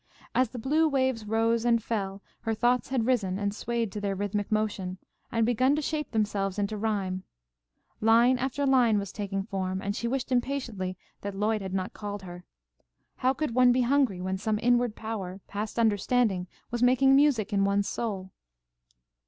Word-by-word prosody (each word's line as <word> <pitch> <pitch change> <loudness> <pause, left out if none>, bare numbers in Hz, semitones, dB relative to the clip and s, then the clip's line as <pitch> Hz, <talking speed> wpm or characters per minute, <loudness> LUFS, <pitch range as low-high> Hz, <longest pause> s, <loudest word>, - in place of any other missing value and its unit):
As 255 -2 +2
the 250 - -8
blue 300 +7 +2
waves 260 -5 0
rose 225 +1 +1
and 235 -1 +3
fell, 200 -3 -3 0.2
her 225 0 -2
thoughts 245 +3 +1
had 255 -4 0
risen 210 -7 +1
and 200 0 -1
swayed 230 -1 -2
to 210 - -5
their 200 -1 -1
rhythmic 205 +1 -2
motion, 205 -4 -1 0.3
and 230 -1 +2
begun 255 +4 +3
to 305 - -1
shape 300 0 -2
themselves 205 -3 -1
into 205 +1 -1
rhyme. 200 -3 -1 0.8
Line 235 +3 +5
after 270 +2 -1
line 250 -5 +4
was 200 -1 -3
taking 195 -2 -3
form, 190 -2 -3
and 200 +1 -3
she 235 - -2
wished 260 +1 -2
impatiently 240 -8 -1 0.2
that 200 -1 -5
Lloyd 210 +2 0
had 190 -1 -4
not 185 0 -2
called 205 -1 -6
her. 175 -1 -9 0.7
How 255 +1 +2
could 300 -3 -2
one 250 0 +6
be 250 +1 +3
hungry 250 -6 +2
when 190 +1 -2
some 215 +1 0
inward 245 -2 +3
power, 200 -4 -5
past 210 +3 -5
understanding, 215 -3 +2 0.2
was 240 0 -2
making 260 +2 +5
music 265 -8 +3
in 200 -1 +3
one's 200 0 +1
soul? 195 -5 -3
220 Hz, 175 wpm, -28 LUFS, 200-245 Hz, 0.8 s, one